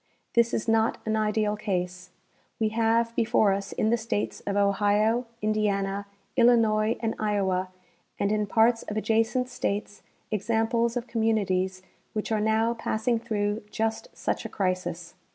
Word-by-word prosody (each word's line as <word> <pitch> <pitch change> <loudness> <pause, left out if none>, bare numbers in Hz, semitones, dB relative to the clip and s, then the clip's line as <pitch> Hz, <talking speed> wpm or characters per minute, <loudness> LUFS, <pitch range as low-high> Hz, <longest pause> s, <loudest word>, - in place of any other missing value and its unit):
This 235 0 +4
is 220 - -2
not 225 0 +2
an 220 0 0
ideal 215 -1 +1
case. 180 -3 -3 0.5
We 220 -1 +2
have 230 +1 +1
before 220 -3 +3
us 195 0 -4
in 220 - 0
the 235 - +3
states 220 -2 -3
of 200 0 0
Ohio, 205 +4 +2 0.2
Indiana, 200 -2 0 0.3
Illinois 230 -3 +4
and 225 -1 0
Iowa, 190 -3 0 0.5
and 200 - +1
in 210 -1 0
parts 230 +2 +3
of 210 - -5
adjacent 225 +3 +1
states 210 -5 -3 0.3
examples 230 +2 +1
of 240 - -3
communities 195 -5 0 0.3
Avhich 215 +1 -2
are - - 0
now 220 +2 +2
passing 230 0 -1
through 210 -2 -1
just 225 - -2
such - - -2
a - - -5
crisis. 180 -3 -2
215 Hz, 145 wpm, -27 LUFS, 205-225 Hz, 0.5 s, This